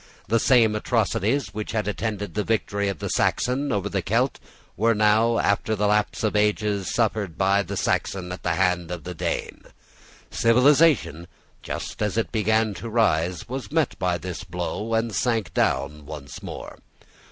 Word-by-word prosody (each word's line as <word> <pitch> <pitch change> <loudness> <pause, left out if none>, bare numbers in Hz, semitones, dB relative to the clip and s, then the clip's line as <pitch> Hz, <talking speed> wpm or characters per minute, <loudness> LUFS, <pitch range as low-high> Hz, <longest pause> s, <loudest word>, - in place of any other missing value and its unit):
The 115 +3 +2
same 115 -3 +4
atrocities 115 +3 0
which 105 +1 -5
had 110 -2 -1
attended 105 -1 -3
the 105 - -1
victory 100 -2 -1
of 100 - -3
the - - -4
Saxon 135 +3 0
over 100 -1 0
the 100 -2 -1
Celt 115 +9 0 0.4
were 115 +3 +2
now, 110 +2 +3
after 100 +2 +1
the 105 0 0
lapse 105 +2 +1
of 110 -1 0
ages, 105 -2 +1
suffered 105 -7 -1
by 100 +1 +3
the 100 +1 -5
Saxon 90 -1 -1
at 90 - -6
the 85 -2 0
hand 90 -2 +1
of 90 -3 -5
the 90 - -6
Dane. 80 - -3 0.7
Civilization, 125 - +3 0.3
just - - -6
as 105 0 -1
it 115 - 0
began 110 0 +1
to 115 +4 -7
rise, 90 -7 +1
was 130 +1 -6
met 160 -3 +1
by 90 -1 +1
this 90 +2 -6
blow, 95 +5 -3
and 115 0 0
sank 110 -7 0
down 75 +1 0
once 70 -3 -8
more. - - -8
105 Hz, 165 wpm, -24 LUFS, 90-115 Hz, 0.7 s, same